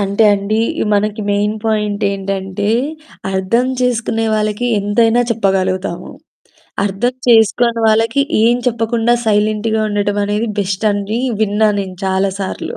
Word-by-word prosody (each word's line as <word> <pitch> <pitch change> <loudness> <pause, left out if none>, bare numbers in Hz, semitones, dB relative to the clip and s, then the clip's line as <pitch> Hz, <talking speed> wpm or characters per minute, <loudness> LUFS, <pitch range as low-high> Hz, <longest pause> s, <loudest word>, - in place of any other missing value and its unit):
అంటే 200 +2 +1
అండి 205 +2 -1 0.3
మనకి 210 +1 0
మెయిన్ 205 +1 +1
పాయింట్ 210 -2 -1
ఏంటంటే, 195 0 -3 0.6
అర్థం 190 +6 +1
చేసుకునే 230 -2 0
వాళ్ళకి 215 +2 -1
ఎంతైనా 225 +3 +2
చెప్పగలుగుతాము. 190 -4 -1 0.7
అర్థం 205 +6 -1
చేసుకోని 230 +1 +3
వాళ్ళకి 225 +5 +2 0.2
ఏం 235 +2 +4
చెప్పకుండా 235 0 +1
సైలెంట్‌గా 215 +1 +1
ఉండటం 205 0 -1
అనేది 210 +3 -1
బెస్ట్ 195 +2 -2
అని 205 +3 -2 0.2
విన్నాను 210 0 +2
నేను 185 -1 -9
చాలా 190 +1 +1
సార్లు. 190 - -5
210 Hz, 120 wpm, -16 LUFS, 200-225 Hz, 0.7 s, ఏం